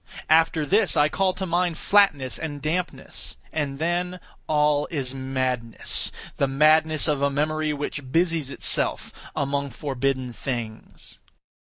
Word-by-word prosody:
After 160 -1 +4
this 195 +2 +3
I 145 +1 +5
call 190 +1 +1
to 190 - -3
mind 175 -1 0
flatness 150 -11 +3
and 150 -3 -5
dampness; 165 +5 -3 0.2
and 145 -3 -2
then 175 +3 -1 0.3
all 150 -1 +2
is 135 -5 -2
madness—the 130 0 -2
madness 155 +3 +3
of 145 -2 +1
a 140 - +3
memory 155 +2 0
which 145 -2 -4
busies 165 -3 +2
itself - - 0 0.2
among 140 0 -1
forbidden 130 -1 -2
things. 115 -4 -6
150 Hz, 120 wpm, -24 LUFS, 135-160 Hz, 0.3 s, I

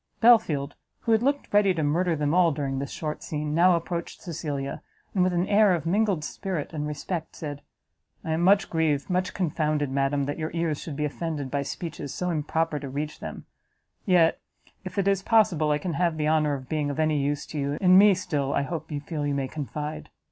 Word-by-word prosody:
Belfield, 175 -12 +4 0.3
who 230 - -1
had, 220 0 +4
looked 280 -1 -1
ready 200 -3 +4
to 160 - -1
murder 165 +4 +1
them 150 0 0
all 175 -2 +5
during 140 -2 -2
this 140 0 -4
short 155 -1 -4
scene, 150 -1 -3
now 175 +2 +5
approached 170 0 -4
Cecilia, 145 -5 -4 0.3
and 185 - +3
with 185 - +2
an 175 0 +1
air 205 -2 +5
of 165 - -5
mingled 195 -2 +1
spirit 175 -2 -4
and 150 -1 -3
respect, 160 +3 -4
said, 145 -2 -6 0.6
"I 160 - -3
am 160 +1 0
much 195 +4 +4
grieved, 160 -1 0
much 185 +1 0
confounded, 155 -5 0
madam, 140 +1 +1
that 145 +3 -3
your 155 0 -2
ears 165 -3 -1
should 155 - -6
be 150 +1 -1
offended 150 -3 -4
by 140 - 0
speeches 150 -1 -5
so 180 0 -2
improper 155 0 -1
to 140 -1 -6
reach 150 +3 -4
them; - - -7 0.6
yet 175 -4 +3 0.4
if 185 0 -8
it 200 -1 +1
is 195 -1 +2
possible 195 -8 +3
I 150 - +3
can 175 +2 -4
have 170 -1 0
the 150 -1 0
honour 155 -2 +2
of 130 -2 -8
being 150 0 -1
of 145 - -4
any 155 -1 +2
use 145 +1 -1
to 150 - -5
you, 140 +1 -1
in 185 -1 +5
me, 200 0 +7
still, 145 -6 -1
I - - +1
hope, 160 +3 -5
you 145 -1 -3
feel 150 -1 -3
you 140 - 0
may 135 -1 -1
confide. 150 +2 -5
155 Hz, 215 wpm, -26 LUFS, 145-180 Hz, 0.6 s, me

